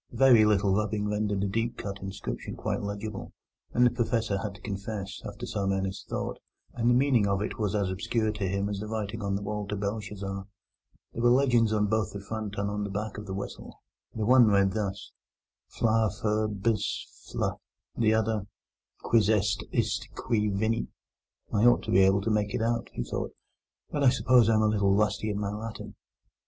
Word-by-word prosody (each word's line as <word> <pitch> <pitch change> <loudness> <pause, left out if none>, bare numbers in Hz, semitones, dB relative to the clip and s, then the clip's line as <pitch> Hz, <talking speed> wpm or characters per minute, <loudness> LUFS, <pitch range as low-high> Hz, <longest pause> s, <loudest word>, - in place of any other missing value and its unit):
A - - -12
very 125 -4 +7
little 100 -2 +3
rubbing 105 0 0
rendered 105 -1 0
the 100 - +1
deeply 115 +4 -2
cut 100 -1 -5
inscription 95 +1 -5
quite - - -2
legible, 100 0 -5 0.4
but 125 - +3
the 120 - +5
Professor 115 -4 0
had 100 -1 -4
to - - -14
confess, 100 -1 -5
after - - -7
some 100 -1 -1
earnest 95 0 -3
thought, - - -3 0.3
that 120 0 -1
the 120 - +5
meaning 125 -5 +3
of 100 -1 +1
it 110 - -5
was 105 -1 0
as 100 -3 0
obscure 110 +3 0
to 105 -2 -3
him 100 +2 -1
as 100 -1 -3
the 105 - -5
writing 110 0 -3
on 100 -1 -1
the 100 - -3
wall 105 0 -3
to 105 - -2
Belshazzar. 100 -1 -4 0.7
There 115 - -4
were 120 - +5
legends 120 -3 +4
both 105 -1 +1
on - - -3
the 100 - -14
front 110 -2 -4
and 100 0 0
on 105 0 -2
the 100 - -3
back 105 +1 -4
of 105 - -9
the 95 - -4
whistle. 100 - -7 0.4
The 110 -2 -1
one 125 0 +7
read 100 -2 +4
thus: 100 -1 -3 0.6
FLA 110 -1 +2
FUR 110 +2 0
BIS 105 +1 -1 0.3
FLE - - -2 0.3
The 110 -1 +3
other: 110 -2 0 0.6
QUIS 110 -3 +3
EST 105 -1 +1
ISTE 115 0 -1
QUI 105 -2 0
VENIT 110 +3 0 0.7
"I 105 +3 +3
ought 120 - +5
to - - -4
be 95 - +5
able 95 +1 +5
to 110 +3 -1
make 105 -1 0
it - - -1
out," 115 0 0
he - - -3
thought; - - -4 0.6
"but 145 - 0
I 135 - +8
suppose 125 -3 +4
I 110 - +4
am 110 - +3
a - - +4
little 100 -2 +3
rusty 105 +1 +1
in 105 -1 -2
my 100 -1 -2
Latin. 110 +2 -6
105 Hz, 205 wpm, -28 LUFS, 100-110 Hz, 0.7 s, I